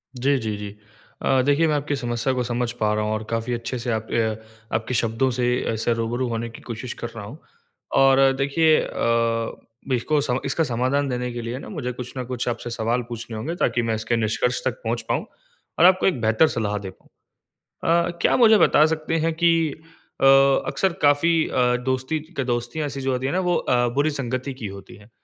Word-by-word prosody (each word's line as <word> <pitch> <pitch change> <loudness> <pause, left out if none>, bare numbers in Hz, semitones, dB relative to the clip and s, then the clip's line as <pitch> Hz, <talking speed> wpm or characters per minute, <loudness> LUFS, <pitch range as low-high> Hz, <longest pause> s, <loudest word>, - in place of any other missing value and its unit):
जी, 135 +3 +2
जी, 110 -3 -3
जी। 105 0 -7 0.5
अ, 130 -1 +3
देखिए 145 +3 +3
मैं 150 - +1
आपकी 145 0 -1
समस्या 120 0 -1
को 125 -1 -1
समझ 120 0 -2
पा 105 -1 +2
रहा 105 0 0
हूँ 110 - -1
और 110 0 -3
काफ़ी 115 +1 -2
अच्छे 120 +1 -3
से 120 0 -2
आप 110 0 -2
अ 110 -2 +1 0.4
आपके 110 +3 -2
शब्दों 115 +3 +1
से 125 0 -1 0.3
ऐसा 110 +2 -1
रूबरू 115 +2 -1
होने 115 0 -3
की 115 - -12
कोशिश 120 +1 -6
कर 120 - -2
रहा 110 - -6
हूँ। 120 +9 -9 0.6
और 135 0 +5
देखिए 155 +3 +3
अ, - - -5 1.0
बिको 130 +5 +1 0.3
इसका 160 +4 +1
समाधान 130 +2 0
देने 125 0 -2
के 120 - -4
लिए 115 +2 -4
ना - - -9
मुझे 140 -10 -4
कुछ 125 0 -8
न 130 - -2
कुछ 125 0 -4
आपसे 120 0 -4
सवाल 115 +2 -1
पूछने 115 -1 -6
होंगे 155 +10 -4
ताकि, 120 -8 +1
मैं 115 -1 -1
इसके 110 +2 -1
निष्कर्ष 115 +3 0
तक - - -2
पहुँच - - -1
पाऊँ - - 0 0.5
और 170 - +7
आपको 185 0 +5
एक 135 -11 0
बेहतर 110 +8 +4
सलाह 105 -5 -2
दे 100 -2 -6
पाऊँ। 95 - -19 1.0
अ, - - -1
क्या - - +4
मुझे 220 -3 +6
बता 150 - +5
सकते 160 +1 -1
हैं 165 - +1
कि 170 +1 +3 0.7
अ, - - +1 0.4
अक्सर 190 -2 0
काफ़ी 145 +4 +4 0.2
अ, 125 -1 +2
दोस्ती 130 +4 -1 0.2
क - - +2
दोस्तियाँ 120 +5 -2
ऐसी 140 -1 -5
जो 135 0 -1
होती 130 +1 -1
हैं 140 - -1
ना, 185 - +2
वो 180 -1 +1
अ, 120 0 +1
बुरी 145 +2 +2
संगति 130 -1 -3
की 120 -5 -7
होती 100 0 -10
हैं। 105 +2 -18
125 Hz, 210 wpm, -23 LUFS, 115-140 Hz, 1.0 s, और